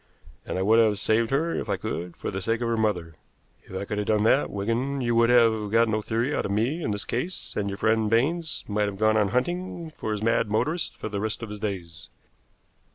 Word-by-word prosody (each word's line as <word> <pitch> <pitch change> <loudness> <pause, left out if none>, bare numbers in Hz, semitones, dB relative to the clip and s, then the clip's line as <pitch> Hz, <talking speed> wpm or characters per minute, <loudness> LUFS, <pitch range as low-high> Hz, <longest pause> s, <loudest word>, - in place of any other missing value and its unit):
And - - -2
I 95 - 0
would 110 +3 +5
have 110 -3 +4
saved 110 +2 +2
her 160 +5 +1
if - - -3
I - - +1
could, 85 +1 -5
for - - -4
the 95 0 -4
sake 115 +3 0
of 120 - 0
her 115 - +1
mother. 90 -8 -1 0.5
If 95 - -10
I 100 - -3
could 105 +1 -3
have 105 - -2
done 105 -1 +2
that, 130 +5 +3
Wigan, 115 +7 -1
you 120 -1 +1
would 115 0 +4
have 115 -3 +4
got 115 +1 +4
no 110 -1 0
theory 115 +6 -1
out - - 0
of - - -4
me 120 +11 0
in 130 - -2
this 105 -1 -2
case, 165 +10 -3
and 100 -1 -1
your 100 - -5
friend 110 0 +2
Baines 155 +9 +1
might 105 0 0
have 100 -1 -5
gone 110 +1 +3
on 105 -2 +3
hunting 175 - -2
for 110 - -6
his 105 0 -2
mad 115 -1 +2
motorist 155 +11 -1
for - - -5
the 105 -2 -3
rest 110 +2 -3
of 115 - -5
his 105 - -6
days." 85 -6 -5
110 Hz, 245 wpm, -26 LUFS, 105-120 Hz, 0.5 s, would